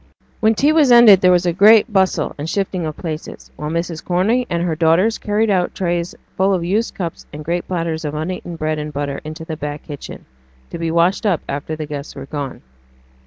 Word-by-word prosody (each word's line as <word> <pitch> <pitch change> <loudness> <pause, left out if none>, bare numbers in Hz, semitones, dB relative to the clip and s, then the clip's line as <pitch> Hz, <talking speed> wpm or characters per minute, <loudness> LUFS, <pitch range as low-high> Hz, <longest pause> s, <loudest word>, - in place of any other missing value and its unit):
When 220 0 +3
tea 290 +7 +3
was 300 -5 +4
ended 230 -6 +8
there 185 - +5
was 180 0 +3
a 175 - +1
great 215 +4 +6
bustle 190 -1 +1
and 150 +3 -4
shifting 185 -4 -2
of 155 - -6
places, 155 -2 -7
while 150 0 -5
Mrs. 170 0 -3
Corney 215 +8 +1
and 170 -1 -1
her 170 -3 -1
daughters 170 +7 +2
carried 210 +1 0
out 180 -2 0
trays 175 -2 -2 0.2
full 190 +1 +2
of 175 - -2
used 205 +7 -1
cups, 175 -5 -5
and 150 0 -8
great 175 +2 -2
platters 165 -3 -2
of 150 0 -4
uneaten 170 +2 -4
bread 155 -1 -2
and 150 0 -5
butter 140 -1 -4
into 155 +1 -7
the 160 -1 -5
back 150 0 -5
kitchen, 145 -3 -9 0.5
to - - -6
be 165 -1 -1
washed 170 +6 +2
up 180 -7 +1
after 145 +3 -4
the 155 0 -5
guests 145 -1 -7
were 135 - -7
gone. 140 -2 -6
170 Hz, 215 wpm, -19 LUFS, 155-195 Hz, 0.5 s, ended